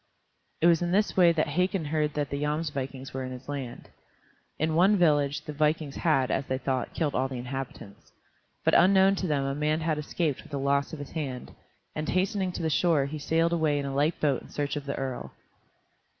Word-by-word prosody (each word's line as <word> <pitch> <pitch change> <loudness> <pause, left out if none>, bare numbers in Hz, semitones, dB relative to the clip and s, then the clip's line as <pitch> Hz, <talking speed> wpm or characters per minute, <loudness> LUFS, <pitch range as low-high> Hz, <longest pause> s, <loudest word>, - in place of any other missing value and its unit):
It - - +3
was 170 -1 +5
in 175 0 -1
this 205 +3 +2
way 175 -2 +6
that 160 -2 0
Hakon 180 +2 0
heard 150 0 -1
that 145 -2 -2
the 140 0 -2
Jomsvikings 145 -3 -3
were 130 0 -3
in 130 - -5
his 130 0 -9
land. 135 -4 -6 0.7
In 160 +1 0
one 190 +6 +5
village 145 -5 +2
the 150 - -5
vikings 150 -1 0
had, 135 -6 +2
as 135 - 0
they 130 - -1
thought, 130 0 -2
killed 150 -4 0
all 130 - +1
the 130 - -6
inhabitants. 125 -4 -7 0.5
But - - +2
unknown 190 +2 +6
to 185 - -2
them 140 -3 0
a 135 - -1
man 150 +2 0
had 155 -1 0
escaped 150 -1 -2
with - - -16
the - - -1
loss 140 +1 +1
of 160 - -6
his 145 -1 -8
hand, 135 -6 -5 0.4
and 155 0 -3
hastening 190 0 0
to - - -4
the 160 - +1
shore 160 -4 +3
he 150 +2 -5
sailed 165 +3 +1
away 155 -3 +2
in 140 - -2
a 135 - -3
light 150 +4 +1
boat 140 -4 +1
in - - -14
search 145 0 -2
of 145 -1 -5
the 140 - -2
earl. 130 -2 -5
150 Hz, 220 wpm, -28 LUFS, 135-165 Hz, 0.7 s, way